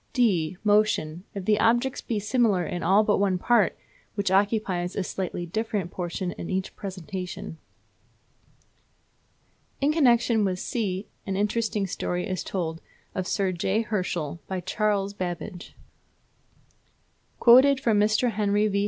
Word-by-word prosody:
(d) 185 Hz, -9 st, +2 dB
Motion, 205 Hz, -5 st, +2 dB
if 195 Hz, -2 st, -5 dB
the 210 Hz, 0 st, +3 dB
objects 240 Hz, +3 st, +2 dB
be 225 Hz, -, -2 dB
similar 210 Hz, -4 st, +2 dB
in 175 Hz, -, -4 dB
all 195 Hz, +5 st, +4 dB
but 210 Hz, -2 st, +2 dB
one 195 Hz, -2 st, +2 dB
part, 225 Hz, +2 st, +2 dB, 0.4 s
which 200 Hz, -2 st, 0 dB
occupies 195 Hz, -3 st, +1 dB
a 200 Hz, -, -1 dB
slightly 180 Hz, -1 st, -4 dB
different 205 Hz, -1 st, -2 dB
portion 180 Hz, 0 st, -3 dB
in 170 Hz, -, -7 dB
each 190 Hz, 0 st, -2 dB
presentation. 185 Hz, -4 st, -6 dB, 2.2 s
In 285 Hz, +2 st, +2 dB
connection 235 Hz, -6 st, +3 dB
with 185 Hz, -2 st, 0 dB
(c) 195 Hz, -2 st, -2 dB, 0.2 s
an 195 Hz, -, -1 dB
interesting 210 Hz, 0 st, 0 dB
story 180 Hz, 0 st, -3 dB
is 185 Hz, -3 st, -3 dB
told 165 Hz, -4 st, -3 dB, 0.3 s
of 185 Hz, -1 st, -3 dB
Sir 195 Hz, -3 st, 0 dB
J. 190 Hz, +5 st, 0 dB
Herschel 175 Hz, -7 st, -2 dB
by 190 Hz, -1 st, -3 dB
Charles 200 Hz, +1 st, 0 dB
Babbage: 180 Hz, -1 st, -6 dB, 1.6 s
Quoted 260 Hz, +3 st, +7 dB
from 225 Hz, -5 st, +2 dB
Mr. 215 Hz, +3 st, +2 dB
Henry 210 Hz, 0 st, +1 dB
V. 200 Hz, -1 st, 0 dB
200 Hz, 135 wpm, -26 LUFS, 180-215 Hz, 2.2 s, Quoted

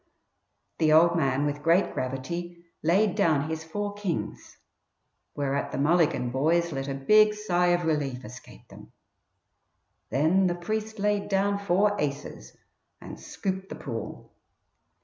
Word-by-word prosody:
The 155 Hz, -2 st, +3 dB
"old 170 Hz, +2 st, +5 dB
man" 140 Hz, -3 st, +1 dB
with 145 Hz, 0 st, -2 dB
great 170 Hz, +5 st, +2 dB
gravity 170 Hz, +7 st, -5 dB, 0.2 s
laid 185 Hz, +5 st, +2 dB
down 155 Hz, -4 st, +2 dB
his 160 Hz, 0 st, -4 dB
four 205 Hz, +6 st, -4 dB
kings, 200 Hz, -5 st, -5 dB, 0.8 s
whereat 140 Hz, -1 st, -2 dB
the -, -, -4 dB
Mulligan 145 Hz, -4 st, +2 dB
boys 165 Hz, +6 st, +1 dB
let 135 Hz, -1 st, -4 dB
a 135 Hz, -, -3 dB
big 210 Hz, +10 st, +4 dB
sigh 180 Hz, -4 st, +1 dB
of 175 Hz, -1 st, +2 dB
relief 140 Hz, -5 st, -1 dB
escape 125 Hz, +4 st, -13 dB
them. -, -, -14 dB, 1.2 s
Then 165 Hz, +7 st, +2 dB
the 175 Hz, -, -1 dB
priest 215 Hz, +5 st, -4 dB
laid 205 Hz, 0 st, 0 dB
down 200 Hz, +1 st, +1 dB
four 200 Hz, +1 st, +2 dB
aces 140 Hz, -, -5 dB, 0.4 s
and -, -, -10 dB
scooped 190 Hz, 0 st, -5 dB
the -, -, -6 dB
pool. 115 Hz, -6 st, -7 dB
170 Hz, 135 wpm, -27 LUFS, 140-195 Hz, 1.2 s, old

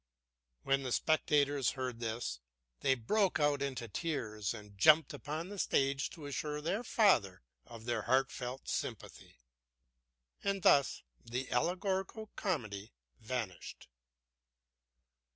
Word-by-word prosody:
When 135 Hz, 0 st, +2 dB
the 130 Hz, -2 st, -4 dB
spectators 145 Hz, -2 st, +2 dB
heard 125 Hz, -3 st, -3 dB
this, 115 Hz, -, -3 dB, 0.4 s
they 135 Hz, -, +3 dB
broke 185 Hz, -, +1 dB
out 145 Hz, -1 st, +2 dB
into 130 Hz, -4 st, -3 dB
tears 110 Hz, -, -2 dB
and 105 Hz, -3 st, -9 dB
jumped 150 Hz, +9 st, +6 dB
upon 155 Hz, +5 st, -5 dB
the 205 Hz, -1 st, -7 dB
stage 135 Hz, -3 st, +1 dB
to 155 Hz, -4 st, -10 dB
assure 150 Hz, +2 st, -3 dB
their 190 Hz, +10 st, -1 dB
father 120 Hz, -, +3 dB, 0.2 s
of 115 Hz, -1 st, -10 dB
their 120 Hz, -2 st, 0 dB
heartfelt 130 Hz, +1 st, 0 dB
sympathy. -, -, -5 dB, 1.1 s
And 195 Hz, -2 st, 0 dB
thus 140 Hz, -1 st, +4 dB, 0.2 s
the 125 Hz, +3 st, -4 dB
allegorical 190 Hz, -, -1 dB
comedy 110 Hz, -, -3 dB, 0.3 s
vanished. 110 Hz, -5 st, -5 dB
135 Hz, 115 wpm, -34 LUFS, 115-155 Hz, 1.1 s, jumped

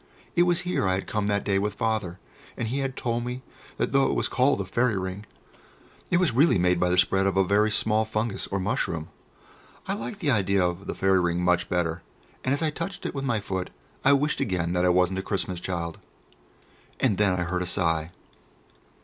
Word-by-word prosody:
It 175 Hz, 0 st, +4 dB
was 175 Hz, +1 st, +2 dB
here 180 Hz, -, 0 dB
I 95 Hz, -, +2 dB
had 95 Hz, 0 st, -3 dB
come 105 Hz, 0 st, -2 dB
that 100 Hz, -1 st, 0 dB
day 100 Hz, -1 st, +1 dB
with 105 Hz, +1 st, -2 dB
Father, 105 Hz, -6 st, -1 dB, 0.4 s
and 115 Hz, -, -2 dB
he 135 Hz, +4 st, -1 dB
had 135 Hz, -1 st, -2 dB
told 120 Hz, -1 st, -1 dB
me 125 Hz, +1 st, -5 dB, 0.3 s
that -, -, -1 dB
though 135 Hz, 0 st, +4 dB
it -, -, 0 dB
was -, -, 0 dB
called 130 Hz, -2 st, +2 dB
a 100 Hz, -, -2 dB
"Fairy 115 Hz, +2 st, +1 dB
Ring," 95 Hz, +2 st, -5 dB, 0.8 s
it 175 Hz, -, +3 dB
was 180 Hz, -3 st, +3 dB
really 140 Hz, 0 st, +4 dB
made 90 Hz, 0 st, +2 dB
by 90 Hz, -, +2 dB
the 90 Hz, -, +1 dB
spread 95 Hz, +1 st, +3 dB
of 95 Hz, -1 st, 0 dB
a 95 Hz, -, +5 dB
very 105 Hz, +3 st, +3 dB
small 110 Hz, +1 st, +2 dB
fungus, 110 Hz, -1 st, -2 dB
or 100 Hz, -, -2 dB
mushroom. 95 Hz, -, -2 dB, 0.8 s
I -, -, 0 dB
liked 120 Hz, -, -5 dB
the 155 Hz, -7 st, +1 dB
idea 100 Hz, -4 st, +2 dB
of 90 Hz, +2 st, -3 dB
the -, -, -3 dB
fairy 95 Hz, -1 st, +3 dB
ring 85 Hz, 0 st, 0 dB
much 90 Hz, 0 st, +2 dB
better, 85 Hz, -1 st, -1 dB, 0.4 s
and 130 Hz, -, 0 dB
as 145 Hz, +3 st, +1 dB
I 155 Hz, -, +1 dB
touched 170 Hz, +5 st, -6 dB
it -, -, -2 dB
with 135 Hz, -1 st, -3 dB
my 120 Hz, -5 st, +1 dB
foot 95 Hz, -3 st, -4 dB, 0.3 s
I 140 Hz, -, +6 dB
wished 145 Hz, +2 st, +1 dB
again 85 Hz, -3 st, -1 dB
that 90 Hz, 0 st, +2 dB
I -, -, +4 dB
wasn't 90 Hz, +1 st, +2 dB
a -, -, -1 dB
Christmas 95 Hz, -2 st, -2 dB
child. 85 Hz, -2 st, -4 dB, 1.0 s
And 105 Hz, -7 st, +2 dB
then 100 Hz, -3 st, +3 dB
I -, -, +1 dB
heard 90 Hz, +1 st, -2 dB
a 90 Hz, -, -1 dB
sigh. 80 Hz, -4 st, 0 dB
100 Hz, 220 wpm, -26 LUFS, 90-125 Hz, 1.0 s, I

